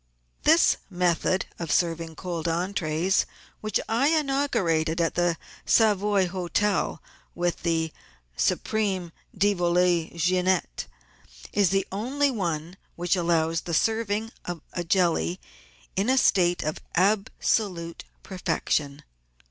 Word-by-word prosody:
This 325 +2 +5
method 180 0 +1
of 170 -3 -3
serving 165 -2 0
cold 170 -1 -4
entries, 175 0 0 0.3
which 215 0 -1
I 235 +5 +2
inaugurated 270 - +1
at 165 -1 +1
the 175 -1 +1 0.3
Savoy 205 -3 +3
Hotel 185 +3 -1 0.3
with 175 0 -1
the 160 -2 0 0.2
" - - -35
Supreme 195 -5 -1 0.3
de 205 +2 +3
Volaille 175 -2 +2
Jeannette," 180 - 0 0.7
is 200 -3 +3
the 195 0 +1
only 265 +8 0
one 175 -5 -3 0.2
which 175 +2 +1
allows 165 -2 +1
of 170 -2 0
serving 225 0 0 0.4
a 175 - -2
jelly 165 - +1 0.6
in 200 +5 +1
a 260 - +3
state 175 -7 +3
of 155 0 -3 0.2
absolute 195 -2 0 0.2
perfection. 150 -6 -2
180 Hz, 110 wpm, -26 LUFS, 165-205 Hz, 0.7 s, This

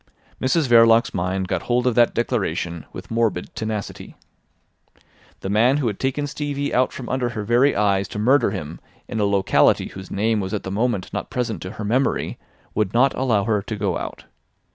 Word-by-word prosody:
Mrs 140 +3 +2
Verloc's 115 -1 +5
mind 95 +1 -1
got 95 -2 -1
hold 125 0 0
of 125 - +3
that 120 0 +3
declaration 90 -8 -2
with - - -10
morbid 115 -6 0
tenacity. 110 -2 -5 1.3
The 95 - -4
man 120 +6 +4
who 145 - -1
had 105 -4 -2
taken 135 +2 -1
Stevie 145 0 -3
out 130 +1 +2
from 125 - -8
under 125 -1 -1
her 110 -3 -4
very 120 +6 +3
eyes 100 -2 +2
to 90 - -8
murder 130 +7 +3
him 75 +2 -6 0.3
in 110 - -4
a 105 - +2
locality 100 -1 +3
whose 95 -1 -10
name 110 +2 0
was 95 +1 -3
at 105 - -4
the 95 - -5
moment 105 -2 -1
not - - -4
present 125 -4 -3
to 90 - -6
her 105 - -6
memory 130 +6 0 0.3
would 105 0 -1
not 130 +3 +4
allow 115 -6 +1
her 105 -1 +1
to 110 +2 -5
go 100 -4 -1
out. - - -7
110 Hz, 190 wpm, -22 LUFS, 100-125 Hz, 1.3 s, Verloc's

